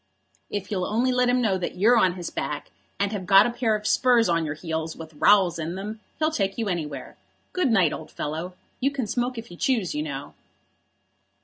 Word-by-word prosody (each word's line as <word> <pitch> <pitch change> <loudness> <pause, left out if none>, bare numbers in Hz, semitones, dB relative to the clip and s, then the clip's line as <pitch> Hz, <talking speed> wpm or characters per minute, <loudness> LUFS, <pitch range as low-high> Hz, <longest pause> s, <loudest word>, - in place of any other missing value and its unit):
If 205 -1 -4
you'll 185 -3 -1
only 240 +4 +1
let 250 0 +2
him 250 0 +3
know 195 -4 +1
that 175 - -4
you're 220 +7 +5
on 190 -6 +4
his 175 -2 -6
back, 150 -1 -4 0.3
and 200 0 +1
have 195 -4 -4
got 195 +1 +8
a 240 - 0
pair 235 -3 +1
of 210 0 -5
spurs 240 -1 +4
on 165 -1 +2
your 150 0 -3
heels 160 0 -4
with 160 -1 -10
rowels 175 +1 +4
in 165 +2 -3
them, 210 +3 -6 0.2
he'll 310 0 +1
take 195 -9 -1
you 225 -2 -1
anywhere. 150 -7 -4 0.4
Good 365 -7 +1
night, 190 -9 +3
old - - -7
fellow. 160 +5 -5 0.2
You 270 - +2
can 275 -4 -3
smoke 245 +3 -2
if 230 -2 -8
you 175 - -10
choose, 225 -7 0
you 150 - -1
know." 140 -2 -6
195 Hz, 215 wpm, -25 LUFS, 165-235 Hz, 0.4 s, got